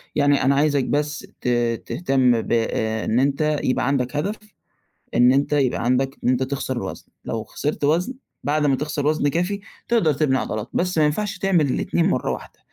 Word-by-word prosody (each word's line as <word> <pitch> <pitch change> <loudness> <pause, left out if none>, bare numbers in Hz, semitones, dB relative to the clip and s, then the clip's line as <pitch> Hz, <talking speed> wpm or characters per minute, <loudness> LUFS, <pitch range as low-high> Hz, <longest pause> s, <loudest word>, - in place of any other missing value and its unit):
يعني 145 -1 +3
أنا 140 +1 +3
عايزك 145 -1 +2
بس 150 +1 -2
ت - - -4 0.4
تهتم 125 -3 +2
ب - - -7
إن 110 0 0
أنت 145 +3 +1
يبقى 130 0 +1
عندك 135 -1 0
هدف 195 +9 -1 0.8
إن 125 +1 +6
أنت 140 +2 +1
يبقى 135 -5 +1
عندك 130 +3 +1
إن - - +2
أنت 130 +1 +2
تخسر 130 -2 -3
وزن، - - -7 0.2
لو 110 -1 -3
خسرت 150 +4 -4
وزن 170 - +2 0.3
بعد 150 +1 +1
ما 140 -2 +3
تخسر 145 +1 -3
وزن 155 -1 +2
كافي، 180 +7 -1 0.3
تقدر 220 -10 +3
تبني 135 -2 +1
عضلات، 110 -1 -3
بس 180 0 0
ما 155 - +5
ينفعش 200 +6 -1
تعمل 180 -6 +2
الاتنين - - 0
مرّه - - 0
واحدة، - - -8
145 Hz, 180 wpm, -22 LUFS, 130-155 Hz, 0.8 s, إن